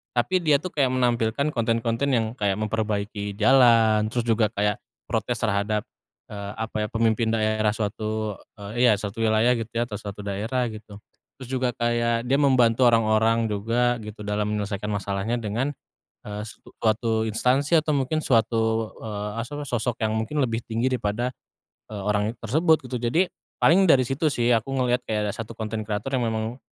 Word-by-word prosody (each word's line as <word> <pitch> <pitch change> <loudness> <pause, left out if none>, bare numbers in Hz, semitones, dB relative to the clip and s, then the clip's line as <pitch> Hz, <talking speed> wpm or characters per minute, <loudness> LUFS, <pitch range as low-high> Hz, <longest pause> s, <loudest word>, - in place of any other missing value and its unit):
Tapi 185 +10 +2
dia 150 -4 +2
tuh 185 - -4
kayak 140 -3 +2
menampilkan 120 +3 +1
konten-konten 115 +1 0
yang 115 -2 +2
kayak 100 -2 +1
memperbaiki 105 -1 -2
jalan, 115 -4 +5
terus 120 +1 -1
juga 115 -1 +3
kayak 105 +1 -1 0.2
protes 120 0 -1
terhadap, 105 0 0 0.4
eee, 100 -3 -7
apa 110 0 -5
ya, - - -4
pemimpin 115 -1 +1
daerah 110 -1 +1
suatu 110 0 -2 0.2
e 105 +4 -4
ya, 115 -4 +5
suatu 105 +2 -5
wilayah 110 +2 +3
gitu 115 -2 -3
ya, 120 - +1
atau 115 - -11
suatu 100 0 -8
daerah 110 +6 -1
gitu. 105 -1 -11 0.4
Terus 130 -2 -10
juga 130 -1 +1
kayak 115 0 0
dia 135 +3 +2
membantu 125 -3 +4
orang-orang 115 0 +3
juga 115 +4 +1
gitu 105 0 -9
dalam 105 0 -1
menyelesaikan 105 0 -3
masalahnya 100 +3 -2
dengan, 120 +7 -2 0.5
eee, 105 0 -6
s 115 - -10
suatu 110 0 0
instansi 130 +8 +2
atau 155 -1 +2
mungkin 145 +3 0
suatu, 115 -2 +1
eee, 105 -2 -4 0.2
aswa 145 +3 -6
sosok 120 -1 -2
yang 110 -1 0
mungkin 110 +7 -1
lebih 115 -3 0
tinggi 115 +3 0
daripada, 120 +2 -1 0.6
eee, 105 -2 -6
orang 105 +2 0
it - - -42
tersebut 160 +7 +2
gitu. 125 -1 -4
Jadi 165 +10 +1 0.3
paling 190 +3 +5
dari 130 -5 +5
situ 135 +5 -1
sih 120 -4 +1
aku 115 +3 +1
ngeliat 125 -1 +1
kayak 105 -1 -1
ada - - -10
1 115 0 -7
konten 110 -1 -4
kreator 105 +6 -3
yang 125 -2 0
memang 110 +2 -3
115 Hz, 175 wpm, -24 LUFS, 105-125 Hz, 0.6 s, jalan